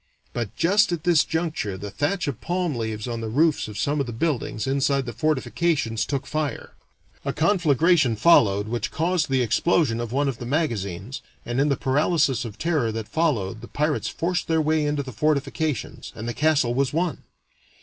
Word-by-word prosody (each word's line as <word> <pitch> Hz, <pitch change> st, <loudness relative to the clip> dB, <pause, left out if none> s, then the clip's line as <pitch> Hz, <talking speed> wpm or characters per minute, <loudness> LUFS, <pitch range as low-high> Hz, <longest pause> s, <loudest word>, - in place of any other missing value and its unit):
But 120 Hz, -5 st, -4 dB
just 200 Hz, +3 st, +3 dB
at 170 Hz, -3 st, -2 dB
this 170 Hz, -4 st, +4 dB
juncture 160 Hz, -, -2 dB
the 100 Hz, +1 st, -7 dB
thatch 145 Hz, -, -1 dB
of 130 Hz, -4 st, -4 dB
palm 175 Hz, -2 st, -1 dB
leaves 110 Hz, -1 st, -3 dB
on 115 Hz, -1 st, -3 dB
the 110 Hz, -, -4 dB
roofs 150 Hz, +5 st, +2 dB
of 105 Hz, -1 st, -8 dB
some 145 Hz, +1 st, 0 dB
of 140 Hz, -, -1 dB
the -, -, -4 dB
buildings 115 Hz, -4 st, -2 dB
inside 135 Hz, 0 st, +1 dB
the 120 Hz, -, -5 dB
fortifications 145 Hz, -2 st, 0 dB
took 140 Hz, -1 st, -2 dB
fire, 155 Hz, -1 st, -3 dB, 0.5 s
a -, -, -1 dB
conflagration 160 Hz, -, +3 dB
followed, 105 Hz, -7 st, +4 dB
which 120 Hz, +1 st, -2 dB
caused 170 Hz, -1 st, 0 dB
the 130 Hz, -2 st, +2 dB
explosion 120 Hz, +1 st, +2 dB
of 120 Hz, -2 st, -5 dB
one 140 Hz, +3 st, +1 dB
of 130 Hz, -4 st, -3 dB
the 120 Hz, -, -6 dB
magazines, 120 Hz, -, -2 dB, 0.2 s
and 120 Hz, +3 st, 0 dB
in 145 Hz, -, +2 dB
the 140 Hz, -, +1 dB
paralysis 145 Hz, -1 st, +1 dB
of 110 Hz, -2 st, -8 dB
terror 155 Hz, -9 st, 0 dB
that 110 Hz, -1 st, -5 dB
followed, 115 Hz, -, -1 dB
the 120 Hz, -, -9 dB
pirates 150 Hz, 0 st, -1 dB
forced 175 Hz, +2 st, -2 dB
their 160 Hz, -1 st, +2 dB
way 155 Hz, 0 st, +2 dB
into 145 Hz, -1 st, -1 dB
the 130 Hz, -2 st, -8 dB
fortifications, 150 Hz, +1 st, -1 dB
and 110 Hz, +1 st, -6 dB
the 120 Hz, -, -2 dB
castle 145 Hz, -5 st, +2 dB
was 135 Hz, +1 st, +1 dB
won. 165 Hz, -1 st, -1 dB
140 Hz, 190 wpm, -24 LUFS, 115-160 Hz, 0.5 s, this